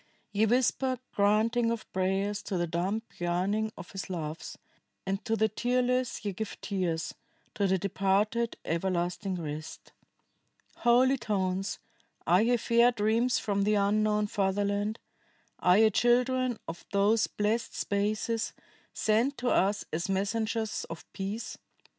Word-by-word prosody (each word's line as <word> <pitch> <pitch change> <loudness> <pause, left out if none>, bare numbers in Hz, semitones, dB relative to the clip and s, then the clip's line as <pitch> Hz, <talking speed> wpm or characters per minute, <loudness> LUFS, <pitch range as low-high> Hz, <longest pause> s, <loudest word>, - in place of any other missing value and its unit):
Ye 210 +2 +2
whisper 255 +2 +2 0.2
granting 220 +4 +3
of 230 -1 -2
prayers 195 +2 0
to 190 - -1
the 175 - +1
dumb 180 +6 -1 0.2
yearning 190 +5 0
of 175 - -9
his 195 -1 -6
loves, 160 -3 -5 0.5
and 195 +1 -2
to 225 - +1
the 220 0 +3
tearless 250 +1 0
ye 200 - -1
give 220 +3 -5
tears, 175 -5 -2 0.4
to 200 -1 +1
the 190 0 +2
departed 200 +4 0
everlasting 180 +3 -1
rest. 155 -2 -7 0.8
"Holy 255 +3 +4
tones, 195 -3 -1 0.5
are 180 +4 +5
ye 240 +2 +3
fair 235 +2 +4
dreams 230 +2 +2
from 200 -1 -1
the 210 +1 +2
unknown 210 +1 +2
fatherland? 205 +1 0 0.6
Are 180 +1 +5
ye 220 0 +5
children 250 +2 +2
of 165 +1 -7
those 205 +3 +3
blessed 215 +3 -1
spaces, 215 +2 -1 0.4
sent 230 +6 +2
to 245 0 -1
us 200 +2 +2
as 170 +4 -2
messengers 220 +3 -1
of 165 - -9
peace? 200 +4 -5
210 Hz, 130 wpm, -29 LUFS, 190-230 Hz, 0.8 s, are